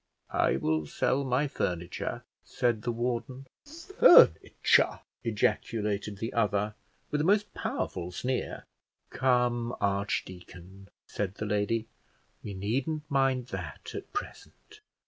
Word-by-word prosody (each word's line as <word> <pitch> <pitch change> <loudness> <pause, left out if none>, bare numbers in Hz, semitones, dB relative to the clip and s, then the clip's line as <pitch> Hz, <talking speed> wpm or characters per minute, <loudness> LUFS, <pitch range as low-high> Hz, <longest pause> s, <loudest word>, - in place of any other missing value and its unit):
"I - - +3
will 80 +2 0
sell 135 - 0
my 135 +2 +1
furniture," 85 -9 -3 0.2
said 120 -3 0
the 120 - -1
warden. 125 +2 -3 0.5
"Furniture!" - - +6 0.2
ejaculated 105 -2 -1
the 115 +3 -4
other, 105 -2 +1 0.4
with 150 - +1
a - - 0
most 205 +4 +2
powerful 90 0 -3
sneer. 125 +7 -3 0.5
"Come, 125 -2 +1
archdeacon," 95 -1 -3 0.2
said 100 -1 -3
the 105 - -4
lady, 105 +2 0 0.6
"we 100 - -6
needn't 130 +11 -2
mind 135 -2 +1
that - - -6
at - - -7
present. 425 +1 -8
115 Hz, 110 wpm, -29 LUFS, 100-130 Hz, 0.6 s, Furniture